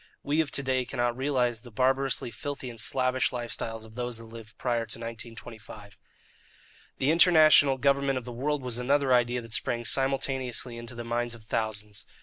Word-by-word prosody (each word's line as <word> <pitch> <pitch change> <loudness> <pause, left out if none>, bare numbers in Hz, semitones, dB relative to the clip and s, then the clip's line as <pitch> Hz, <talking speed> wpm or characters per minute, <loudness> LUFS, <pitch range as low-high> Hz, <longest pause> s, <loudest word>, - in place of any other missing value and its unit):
We 150 +3 +2
of 155 - -3
to 140 - +2
day 130 -1 +1
cannot 120 -2 -1
realize 125 -4 0
the 125 - -12
barbarously 130 +1 +1
filthy 140 -2 -5
and 115 - -11
slavish 130 +1 +1
lives 120 -1 -4
of 110 -1 -6
those 120 0 -4
that 115 - -10
lived 115 -1 -12
prior 120 -2 0
to 115 - -3
1925. 115 -3 -9 1.0
The 135 +3 +2
international 155 -5 +6
government 140 0 +2
of 125 - -5
the 125 - -6
world 140 +4 -2
was 125 -1 -2
another 135 +1 +2
idea 120 0 +2
that 115 -1 -9
sprang 120 +1 -1
simultaneously 135 -2 0
into 120 +1 -8
the 120 - -5
minds 120 0 -1
of 115 - -15
thousands. 105 -2 -3
125 Hz, 175 wpm, -28 LUFS, 115-135 Hz, 1.0 s, international